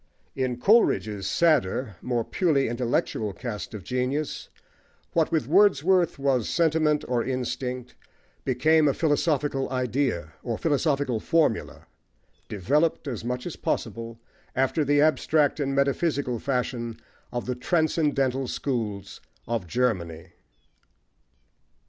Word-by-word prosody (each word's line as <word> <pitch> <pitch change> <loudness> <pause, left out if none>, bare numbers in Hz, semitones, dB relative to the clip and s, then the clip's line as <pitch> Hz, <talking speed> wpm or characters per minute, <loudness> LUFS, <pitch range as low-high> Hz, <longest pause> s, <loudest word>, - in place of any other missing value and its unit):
In 130 -2 -1
Coleridge's 110 - +3
sadder, 130 - +1
more 120 -2 -1
purely 150 - +1
intellectual, 115 -3 -1
cast 110 0 -6
of 100 - -7
genius, 130 - -2 0.6
what 165 -1 +2
with 155 -7 0
Wordsworth 180 -1 +4
was 135 -4 +1
sentiment 155 -3 +2
or 120 -2 0
instinct 125 -1 -3 0.5
became 155 +4 +3
a 140 - +2
philosophical 145 -3 0
idea, 125 - -1
or 115 -3 -3
philosophical 145 -5 0
formula, 155 -4 0 0.6
developed, 145 - +1
as 120 -6 -4
much 125 +1 -3
as 175 - -5
possible, 115 +1 -3 0.4
after 135 +4 +1
the 145 0 +3
abstract 155 -1 +2
and 135 -1 -1
metaphysical 140 -3 0
fashion 125 -3 -2 0.3
of 120 - -3
the 125 - -1
transcendental 140 -2 +1
schools 105 -9 -3 0.3
of 115 -6 -2
Germany. 85 -7 -1
130 Hz, 110 wpm, -26 LUFS, 120-150 Hz, 0.6 s, Wordsworth